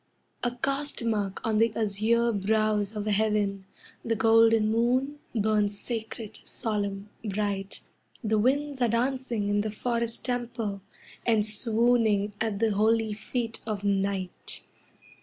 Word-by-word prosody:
A 245 Hz, -, +1 dB
caste 275 Hz, 0 st, -1 dB
mark 205 Hz, -4 st, -1 dB
on 220 Hz, -1 st, +2 dB
the 230 Hz, 0 st, +4 dB
azure 225 Hz, +2 st, +2 dB
brows 210 Hz, 0 st, +1 dB
of 210 Hz, -1 st, -3 dB
Heaven, 205 Hz, -2 st, +1 dB, 0.4 s
The 225 Hz, -, 0 dB
golden 225 Hz, 0 st, +5 dB
moon 255 Hz, +6 st, +1 dB, 0.2 s
burns 210 Hz, -1 st, +1 dB
sacred, 220 Hz, -2 st, -5 dB
solemn, 205 Hz, -2 st, -2 dB
bright 200 Hz, -2 st, -2 dB, 0.4 s
The 215 Hz, -1 st, +2 dB
winds 275 Hz, +3 st, +1 dB
are 240 Hz, -, +4 dB
dancing 240 Hz, -2 st, 0 dB
in 205 Hz, 0 st, +2 dB
the 215 Hz, -, -2 dB
forest 235 Hz, +1 st, -1 dB
temple, 240 Hz, -5 st, -2 dB, 0.4 s
And 220 Hz, -3 st, +3 dB
swooning 220 Hz, -1 st, +2 dB
at 220 Hz, -3 st, 0 dB
the 225 Hz, +1 st, +2 dB
holy 220 Hz, +1 st, +2 dB
feet 225 Hz, +2 st, -3 dB
of 210 Hz, -2 st, -3 dB
Night. 195 Hz, -2 st, -1 dB
220 Hz, 125 wpm, -28 LUFS, 205-235 Hz, 0.4 s, golden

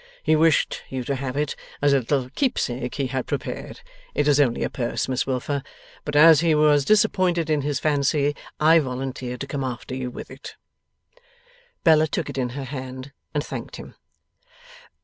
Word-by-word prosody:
He 155 Hz, -, +3 dB
wished 160 Hz, 0 st, +2 dB
you 130 Hz, -1 st, -3 dB
to 140 Hz, -, -2 dB
have 135 Hz, 0 st, -4 dB
it, 150 Hz, 0 st, -1 dB, 0.2 s
as 145 Hz, -1 st, +3 dB
a 140 Hz, -, +4 dB
little 130 Hz, +1 st, -1 dB
keepsake 130 Hz, -, -1 dB
he 140 Hz, -, -1 dB
had 130 Hz, 0 st, -3 dB
prepared -, -, -5 dB, 0.3 s
it 145 Hz, -, +1 dB
is 145 Hz, -1 st, +4 dB
only 125 Hz, -5 st, +2 dB
a -, -, -1 dB
purse, 120 Hz, -3 st, -2 dB
Miss 130 Hz, 0 st, -1 dB
Wilfer 135 Hz, +2 st, -1 dB, 0.4 s
but 150 Hz, -, -4 dB
as 155 Hz, 0 st, +8 dB
he 165 Hz, -1 st, +3 dB
was 150 Hz, -1 st, +4 dB
disappointed 185 Hz, -6 st, +2 dB
in 150 Hz, -1 st, +2 dB
his 145 Hz, 0 st, -1 dB
fancy, 145 Hz, 0 st, +1 dB, 0.2 s
I 160 Hz, +2 st, +6 dB
volunteered 130 Hz, -2 st, -4 dB
to -, -, -2 dB
come 140 Hz, 0 st, -4 dB
after 125 Hz, -1 st, -5 dB
you 130 Hz, -1 st, -3 dB
with -, -, -9 dB
it.' -, -, -10 dB, 1.3 s
Bella 155 Hz, -2 st, +5 dB
took 155 Hz, +1 st, -3 dB
it -, -, -9 dB
in 125 Hz, -1 st, 0 dB
her 140 Hz, -, -3 dB
hand, 130 Hz, 0 st, -7 dB, 0.2 s
and 145 Hz, +1 st, 0 dB
thanked -, -, -6 dB
him. -, -, -10 dB
140 Hz, 180 wpm, -23 LUFS, 130-150 Hz, 1.3 s, as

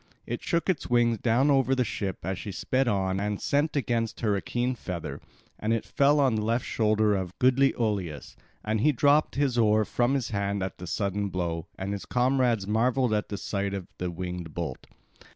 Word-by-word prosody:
It -, -, -4 dB
shook 170 Hz, -1 st, 0 dB
its 185 Hz, -7 st, -1 dB
wings 120 Hz, -2 st, +3 dB
down 130 Hz, +5 st, +3 dB
over 135 Hz, -1 st, +3 dB
the 125 Hz, -1 st, +1 dB
ship 95 Hz, -4 st, -3 dB
as 95 Hz, 0 st, -2 dB
she 100 Hz, -, -5 dB
sped 130 Hz, +8 st, 0 dB
on 95 Hz, -3 st, 0 dB
and 105 Hz, 0 st, -2 dB
sent 145 Hz, +2 st, 0 dB
against 115 Hz, -4 st, -1 dB
her 105 Hz, -3 st, +2 dB
a 100 Hz, -, -1 dB
keen 125 Hz, +1 st, -1 dB
feather, 90 Hz, -8 st, -6 dB, 0.4 s
and 110 Hz, +2 st, 0 dB
it 115 Hz, -, -1 dB
fell 145 Hz, +1 st, +3 dB
on 135 Hz, -4 st, +3 dB
the 110 Hz, -, 0 dB
left 115 Hz, +2 st, 0 dB
shoulder 110 Hz, -1 st, +2 dB
of 95 Hz, -2 st, -3 dB
goodly 130 Hz, +2 st, +3 dB
Oileus, 100 Hz, -10 st, -2 dB, 0.3 s
and 110 Hz, 0 st, 0 dB
he 150 Hz, -, +5 dB
dropped 145 Hz, +3 st, +3 dB
his 135 Hz, -3 st, +1 dB
oar 110 Hz, -1 st, +4 dB
from 125 Hz, +5 st, +1 dB
his 130 Hz, -5 st, -2 dB
hands 100 Hz, -1 st, -1 dB
at 95 Hz, -, -5 dB
the 90 Hz, -, -7 dB
sudden 100 Hz, +3 st, -1 dB
blow, 85 Hz, -3 st, -3 dB
and 95 Hz, +1 st, -3 dB
his 100 Hz, -, -6 dB
comrades 125 Hz, -4 st, +2 dB
marvelled 120 Hz, +3 st, +1 dB
at 105 Hz, 0 st, -1 dB
the 100 Hz, -, -3 dB
sight 100 Hz, +1 st, -2 dB
of 95 Hz, -2 st, -5 dB
the 90 Hz, -, -2 dB
winged 90 Hz, -2 st, -6 dB
bolt. -, -, -5 dB
110 Hz, 205 wpm, -27 LUFS, 100-125 Hz, 0.4 s, he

